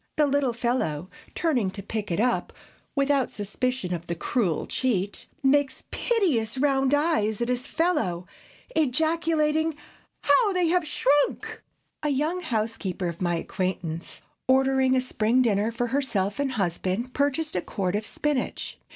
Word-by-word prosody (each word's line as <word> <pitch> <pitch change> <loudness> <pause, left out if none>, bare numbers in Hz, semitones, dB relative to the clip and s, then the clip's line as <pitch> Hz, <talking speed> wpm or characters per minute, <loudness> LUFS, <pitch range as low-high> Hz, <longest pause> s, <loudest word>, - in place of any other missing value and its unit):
The 300 - +5
little 280 -2 +2
fellow, 225 - -1 0.2
turning 260 - +1
to 200 +1 -7
pick 215 0 -4
it 175 - -1
up, 245 +2 +1 0.4
without 275 -2 +2
a - - -18
suspicion 210 -1 -2
of 170 0 -5
the 170 - -2
cruel 180 -2 0
cheat, 205 -6 -1 0.2
makes 275 0 +2
piteous 285 - +1
round 270 0 +3
eyes 290 -9 +1
at 235 0 -1
his 250 +2 -1
fellow, 185 - 0 0.5
ejaculating, 315 +1 +2 0.5
"How 425 -5 +4
they 360 -2 +2
have 355 -1 +2
swhrunk!" 290 -1 +1 0.4
A 300 - 0
young 305 +6 0
housekeeper 215 - -2
of 170 +1 -8
my 175 -1 +1
acquaintance, 175 -1 -3 0.3
ordering 265 0 +4
a 255 - +3
spring 250 0 +2
dinner 215 -1 +2
for 235 +1 -1
herself 230 -6 -1
and 275 -2 0
husband, 195 +4 -1
purchased 285 +1 0
a 180 - +1
quart 185 0 -2
of 210 - -1
spinach. 290 +3 -2
255 Hz, 145 wpm, -26 LUFS, 200-290 Hz, 0.5 s, The